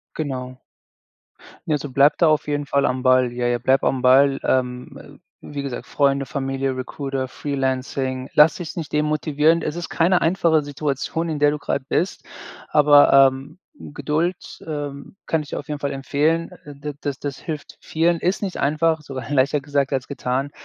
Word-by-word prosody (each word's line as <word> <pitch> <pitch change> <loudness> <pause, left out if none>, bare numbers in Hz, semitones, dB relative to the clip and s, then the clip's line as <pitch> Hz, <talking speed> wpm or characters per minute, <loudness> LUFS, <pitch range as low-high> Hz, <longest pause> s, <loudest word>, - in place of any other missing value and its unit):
Genau. 130 -4 -5 1.1
Ja, 155 - 0
also, 145 0 -5
bleib 140 +3 +4
da 170 - +4
auf 155 -1 +2
jeden 145 0 -1
Fall 140 0 +1
am 125 0 -1
Ball. 130 -1 +4
Ja, 120 0 -1
ja, 120 0 +1
bleib 130 +2 +2
am 130 - +1
Ball. 135 +2 +5
Ähm, 125 +1 -1
äh, - - -13 0.3
wie 145 -1 -6
gesagt, 135 -3 -5
Freunde, 140 -1 +1
Familie, 135 0 -2
Recruiter, 135 +1 -4
Freelancing. 130 -1 -3
Lass 150 +1 +6
dich 170 -3 -7
nicht 165 -4 -5
demotivieren. 150 +1 +1
Es 155 - -3
ist 175 -1 -5
keine 175 +2 +2
einfache 165 -2 +2
Situation, 145 +3 -3
in 155 -2 -3
der 145 0 +4
du 150 - -2
grade 140 -2 -3
bist, 180 +4 -1 0.4
aber, 145 -1 +6
ähm, 135 +4 +3 0.2
Geduld, 160 +5 -3
ähm, 145 0 -6
kann 160 - 0
ich 150 - -11
dir - - -4
auf 145 - -11
jeden 150 -1 -3
Fall 140 0 -2
empfehlen. 150 +4 0
Äh, 145 -1 -10
d 145 +1 -6
das 140 -2 -4
das 140 -2 -5
hilft 155 -3 -7
vielen. 165 +1 0
Ist 180 +5 -1
nicht 195 -3 -3
einfach, 155 +3 +1
sogar 130 -5 -7
leichter 140 +1 +2
gesagt 140 -1 -1
als 130 -2 -2
getan, 135 0 -2
145 Hz, 180 wpm, -22 LUFS, 135-155 Hz, 1.1 s, Lass